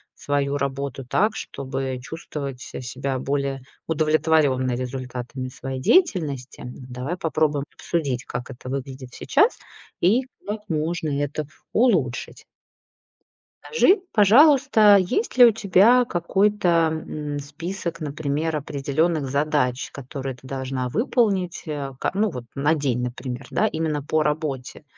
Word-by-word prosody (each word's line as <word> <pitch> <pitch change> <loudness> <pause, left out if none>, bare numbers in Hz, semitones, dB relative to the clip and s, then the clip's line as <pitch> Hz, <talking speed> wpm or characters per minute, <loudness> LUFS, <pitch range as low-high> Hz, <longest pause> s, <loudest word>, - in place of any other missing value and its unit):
свою 145 0 -1
работу 140 -1 -3
так, 210 - +1
чтобы 135 -1 -4
чувствовать 140 -3 -6
се - - -7
себя 130 +2 -3
более 140 -1 -2 0.2
удовлетворённой 155 -5 +2
результатами 130 0 -5
своей 130 0 -6
деятельности. 155 - +1
Давай 125 +6 -6
попробуем 150 -4 0
обсудить, 140 -7 -2
как 125 +2 -5
это 125 +1 -9
выглядит 130 -1 -6
сейчас 435 +5 +2 0.4
и 225 +9 +4 0.2
как 210 +1 -3
можно 160 0 -1
это 145 +1 -3 0.3
улучшить. 170 - +1 1.2
Скажи, 395 -4 +3
пожалуйста, 225 -1 +6
есть 250 - -1
ли 245 - +10
у 230 - +7
тебя 215 +4 +5
какой-то, 175 -2 +2
м, 150 -2 -4
список, 165 +4 -5
например, 155 +1 -2
определённых 145 +1 -1
задач, 140 -3 0
которые 135 -1 -6
ты 130 - -19
должна 130 -1 -3
выполнить, 200 - 0
э, 145 -3 -4
ка - - 0
ну 210 +2 +2
вот 125 -7 -6
на 145 +3 +2
день, 130 -5 0
например, 125 +1 -5
да, 220 - +2
именно 155 -5 -2
по 155 +1 +1
работе. 150 -2 -2
145 Hz, 125 wpm, -23 LUFS, 130-175 Hz, 1.2 s, ли